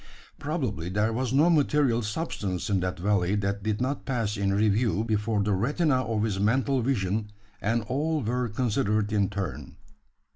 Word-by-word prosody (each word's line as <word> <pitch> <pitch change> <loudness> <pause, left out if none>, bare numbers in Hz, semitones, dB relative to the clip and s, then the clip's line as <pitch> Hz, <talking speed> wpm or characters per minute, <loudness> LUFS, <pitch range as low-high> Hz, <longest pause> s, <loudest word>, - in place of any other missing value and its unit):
Probably, 130 - -2
there 105 +4 +1
was 125 +1 -1
no 145 +5 +4
material 145 -6 +3
substance 105 - -3
in 100 - +3
that 90 0 -2
valley 95 0 +1
that 100 0 -1
did 105 0 -1
not 130 +3 -2
pass 115 -6 -1
in 100 -1 0
review 105 0 +2
before 105 -1 0
the 105 0 +1
retina 130 - +1
of 110 -2 -1
his 105 -3 -1
mental 130 +6 +2
vision; 105 -4 -1 0.3
and 115 +2 0
all 150 +5 -1
were 120 +2 -1
considered 105 -2 0
in 100 -2 +2
turn. 100 -2 -5
110 Hz, 160 wpm, -27 LUFS, 100-130 Hz, 0.3 s, no